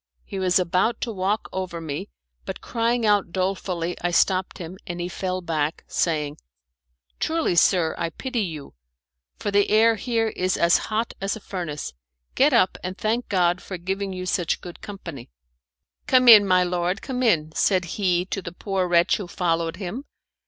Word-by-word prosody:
He 195 - -5
was 185 -1 +3
about 185 +5 +1
to 235 - -2
walk 200 +1 -1
over 185 -2 -4
me, 150 - -5 0.3
but - - -6
crying 235 0 0
out 205 -4 +2
dolefully 185 -2 -2
I 175 - 0
stopped 185 +1 +1
him, 180 +2 -8
and 175 -1 -5
he 175 - -2
fell 185 0 -3
back, 160 -3 -2
saying, 150 -3 -1 0.8
"Truly, 325 - 0
sir, 170 -1 +4
I 170 -1 -1
pity 250 - -3
you, 160 -7 -5 0.6
for 205 - -3
the 200 0 +3
air 225 +1 +5
here 225 -1 0
is 185 -2 -1
as 170 +1 +4
hot 220 +1 -1
as 195 +1 -1
a - - -8
furnace. 170 -8 -5 0.4
Get 285 +3 +4
up, 230 -7 +3
and 185 +1 -4
thank 230 +3 -1
God 180 -2 +2
for 185 - -6
giving 190 +3 -3
you 185 -1 -5
such 175 -3 0
good 175 -1 -10
company." 170 - -8 0.8
"Come 255 -1 +4
in, 210 -4 +10
my 185 -1 +4
lord, 180 +2 -1
come 255 -2 -3
in," 160 -11 +2
said 185 +2 +2
he 180 0 0
to 195 - -2
the 170 - -7
poor 190 -1 -1
wretch 170 0 +3
who 200 - -6
followed 165 -2 -1
him. 200 +8 -6
185 Hz, 175 wpm, -24 LUFS, 175-210 Hz, 0.8 s, in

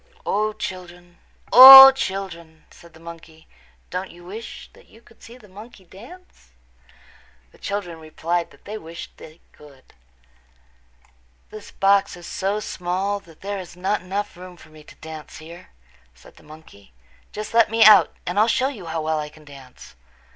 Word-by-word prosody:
"O, 215 +1 -1
children, 175 -3 -10 0.3
O, 270 +2 +11
children," 190 -9 -7
said 170 -1 -19
the - - -17
monkey, 165 -1 -14 0.4
"don't 185 +1 -6
you 175 0 -17
wish 215 +6 -10
that - - -22
you 225 - -21
could 230 -1 -25
see 235 +2 -15
the 220 -4 -20
monkey 205 +1 -15
dance?" 230 - -17 1.0
The - - -24
children 185 -5 -6
replied 165 +2 -4
that - - -24
they 215 +1 -8
wished 165 -1 -12
they 160 +1 -16
could. 140 -3 -20 1.6
"This 215 -1 -12
box 195 -1 0
is 175 - -14
so 200 +2 -4
small 190 +1 -4
that 165 -5 -21
there 200 0 -6
is 175 -1 -12
not 195 +3 -2
room 180 - -19
enough 205 +1 -4 0.3
for 155 - -18
me 155 -1 -17
to - - -17
dance 160 -2 -12
here," 170 +3 -14 0.5
said - - -20
the - - -19
monkey. 150 - -18 0.4
"Just 215 +1 -8
let 230 -1 +3
me 225 +1 +2
out 215 0 +5
and 180 +4 -3
I'll 215 - +3
show 260 +3 0
you 205 -11 -11
how 160 -1 -5
well 155 0 -2
I 150 0 -7
can 155 0 -20
dance." 135 - -16
180 Hz, 170 wpm, -21 LUFS, 160-210 Hz, 1.6 s, O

